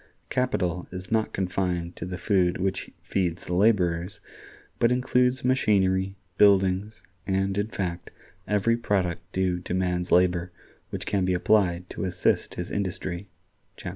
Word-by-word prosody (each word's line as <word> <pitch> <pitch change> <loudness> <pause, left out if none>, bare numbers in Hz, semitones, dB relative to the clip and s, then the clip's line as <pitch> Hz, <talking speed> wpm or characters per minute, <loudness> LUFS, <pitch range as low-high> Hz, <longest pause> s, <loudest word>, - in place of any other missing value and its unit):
Capital 90 -9 0
is 90 +2 -7
not 110 -1 +1
confined 90 -2 -2
to - - -6
the 90 0 -4
food 90 -2 +2
which 95 +1 -2
feeds 90 -2 -1
the 90 - -4
laborers, 90 -3 +2 0.6
but 115 - +4
includes 125 0 +2
machinery, 95 -6 +2 0.2
buildings, 100 +1 +3 0.2
and, 95 0 0
in 100 +1 0
fact, 90 -5 -4 0.4
every 105 +3 +2
product 95 -7 0
due 90 -1 0
to 90 0 -4
man's 90 -1 -1
labor 90 0 +3 0.4
which - - -5
can 100 -2 0
be 90 0 +1
applied 90 -2 +2
to - - -4
assist 90 - 0
his 90 - -5
industry" 95 -1 -3 0.5
(chap. - - -6
95 Hz, 140 wpm, -26 LUFS, 90-105 Hz, 0.6 s, but